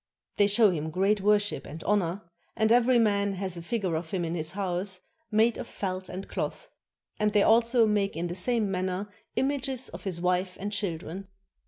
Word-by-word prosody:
They 205 - +5
show 210 0 +5
him 160 -2 -3
great 195 +5 +1
worship 205 0 +2
and 160 +3 -8
honor, 200 -1 0 0.3
and 220 0 +2
every 245 +1 +5
man 200 -3 +2
hath 190 -1 -4
a 170 - -6
figure 190 0 -2
of 160 0 -4
him 180 -2 -1
in 165 - -3
his 160 0 -2
house, 190 -1 -1 0.3
made 220 +2 +3
of - - -5
felt 185 -1 -4
and 190 +2 -6
cloth; - - -4 0.5
and 210 -1 +1
they 205 -2 +5
also 230 +1 +5
make 205 -5 0
in 170 - -1
the 175 - -3
same 215 +2 +1
manner 190 +2 -2 0.2
images 265 0 0
of - - -10
his 185 -3 -2
wife 180 +1 0
and 205 +2 -4
children. 185 -1 -3
200 Hz, 190 wpm, -28 LUFS, 180-215 Hz, 0.5 s, They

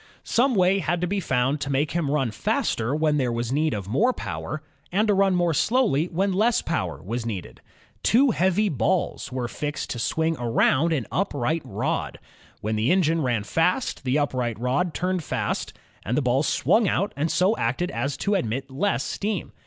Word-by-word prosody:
Some 250 +1 +2
way 190 +1 +3
had 175 -1 -1
to - - +1
be 195 +3 -1
found 135 -3 0
to 140 - -3
make 140 +2 +1
him 165 -4 -1
run 135 -5 +1
faster 115 +3 -1
when 155 -1 +2
there 130 -4 +1
was 120 0 -2
need 150 -2 +1
of 100 -3 -5
more 220 - +2
power, 155 -9 -5 0.3
and 210 +5 +2
to 210 - +4
run 195 -1 +3
more 175 -2 +2
slowly 210 - +2
when 190 +3 0
less 220 +5 +2
power - - -2
was 115 +5 -3
needed. 105 -6 -6 0.4
Two 260 +3 +4
heavy 190 +2 +2
balls 120 - -1
were 125 -1 -2
fixed 145 +3 -4
to 120 - -4
swing 160 +7 0
around 130 +6 +2
an 145 -7 0
up 195 -3 -1
right 155 +5 0
rod. - - -2 0.4
When 110 +1 -1
the 110 +4 +2
engine 165 -3 +2
ran 120 -6 0
fast, 180 - 0
the 130 +2 +1
upright 125 -6 -1
rod 135 +8 0
turn 185 +1 0
ed 170 - -5
fast, - - -2 0.3
and 120 +5 -1
the 150 - +1
balls 130 +4 +2
swung 220 -1 +3
out 200 +3 0
and 150 +4 -1
so 185 +7 +2
acted 135 +11 -1
as 140 -1 -2
to 205 - +2
admit 135 - -2
less 195 +10 0
steam. 205 -2 -3
155 Hz, 195 wpm, -24 LUFS, 125-185 Hz, 0.4 s, to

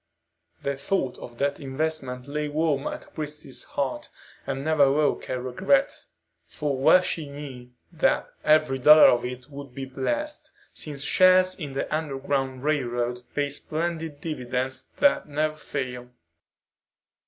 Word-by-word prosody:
The 140 -1 -1
thought 135 -2 -1
of 120 -1 -10
that 140 +2 0
investment 135 -2 -3
lay 150 +1 -2
warm 150 -1 0
at - - -7
Christie's 150 -3 -4
heart, 135 -2 -3 0.4
and 135 +1 -3
never 150 -3 +4
woke 150 +1 +1
a 130 - -1
regret, 190 - +2 0.5
for 145 -2 -2
well 135 +7 +6
she 160 -4 -3
knew 135 -4 -9 0.2
that - - +1 0.2
every 155 -3 +3
dollar 150 +4 +9
of 120 -1 +2
it 125 +2 -6
would 140 -2 -9
be 135 -1 -4
blessed, 295 - -3 0.2
since 145 -2 -4
shares 185 +2 +5
in 145 -7 -6
the 135 - -1
Underground 135 -3 -2
Railroad 125 -5 -1
pay 145 -1 0
splendid 160 0 -3
dividends 130 -4 -3
that 285 - +3
never 155 +1 0
fail. 125 -5 -5
140 Hz, 135 wpm, -26 LUFS, 130-155 Hz, 0.5 s, dollar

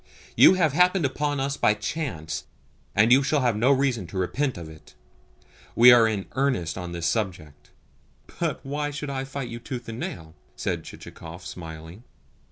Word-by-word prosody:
You - - +8
have 160 -6 +2
happened 180 0 +3
upon 145 +1 -1
us 140 +1 -2
by 105 - +3
chance, 105 - -4 0.5
and 110 +4 +4
you 130 +2 +7
shall 140 +1 +1
have 120 -4 +2
no 120 +6 +3
reason 130 -8 +1
to 90 - -7
repent 125 +8 -1
of 85 -2 -8
it. 80 0 -15 0.8
We 125 +1 +9
are 120 -2 +7
in 105 -3 -2
earnest 130 -12 0
on 90 -2 -6
this 85 -1 -4
subject." 85 -9 -3 0.7
"But - - -2
why 145 +2 -2
should 145 0 -5
I 135 -1 -3
fight 135 -2 -5
you 120 - -6
tooth 125 -1 -7
and 115 +1 -6
nail?" 80 -7 -6 0.2
said - - -3
Chichikov, 85 +2 -11
smiling. 80 +4 -9
120 Hz, 175 wpm, -25 LUFS, 90-140 Hz, 0.8 s, We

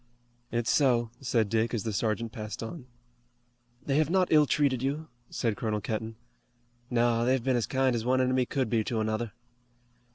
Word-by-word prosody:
"It's 120 -1 0
so," 120 -5 +3
said 120 -5 +1
Dick 115 +2 0
as 110 - -2
the 110 - -3
sergeant 110 +2 -1
passed 110 -3 -6
on. 125 +3 -7 1.0
"They 140 0 +1
have 155 -1 +2
not 185 0 +2
ill 150 -2 +6
treated 135 -4 +2
you?" 145 +4 -2 0.2
said 115 -3 -1
Colonel 105 -1 -1
Kenton. 110 +1 -4 0.7
"No, 120 -1 +2
they've 130 0 +2
been 130 0 +1
as 120 -4 0
kind 130 -2 +1
as 115 - -2
one 130 +2 +2
enemy 130 -1 +2
could 135 -4 0
be 110 0 +1
to 115 -3 -1
another." 110 +1 -1
120 Hz, 175 wpm, -29 LUFS, 110-130 Hz, 1.0 s, ill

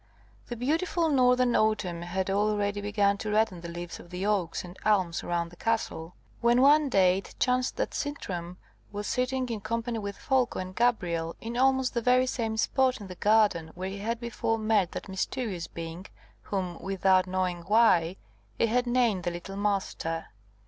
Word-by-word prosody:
The 240 - -5
beautiful 320 +7 0
northern 250 -3 +3
autumn 210 -6 +1
had 185 +2 -2
already 205 0 0
begun 205 -1 +1
to 215 - -4
redden 210 -4 +1
the 170 - -7
leaves 175 0 -7
of 175 - -13
the 180 +2 -4
oaks 195 -5 0
and 180 0 -10
elms 185 -6 +1
round 170 -1 -2
the - - -13
castle, 180 -6 -2 0.2
when 235 +1 +4
one 290 +2 +5
day 185 -4 +4
it - - -12
chanced 250 0 +1
that - - -2
Sintram 180 - -4 0.3
was 205 0 -5
sitting 255 +2 -1
in 225 -3 -3
company 230 +2 -2
with 200 -1 -5
Folko 260 -3 +1
and 185 0 -5
Gabrielle 175 -9 0
in 230 +1 -6
almost 265 0 +2
the 235 - 0
very 250 +2 +4
same 225 -3 -2
spot 260 +2 +2
in 205 - -8
the 185 - -8
garden 205 -6 +3
where 185 +1 -4
he 200 - -6
had 225 +3 -2
before 230 -1 -1
met 215 -5 +1
that - - -6
mysterious 190 -1 -3
being 165 +3 -7 0.3
whom, 185 -4 -3
without 190 -1 +2
knowing 185 -1 -1
why, 190 -6 +4 0.4
he - - +3
had 245 +2 +1
named 240 -6 +2
the - - +2
little 175 +3 -7
Master. 195 -5 -2
205 Hz, 175 wpm, -28 LUFS, 180-240 Hz, 0.4 s, one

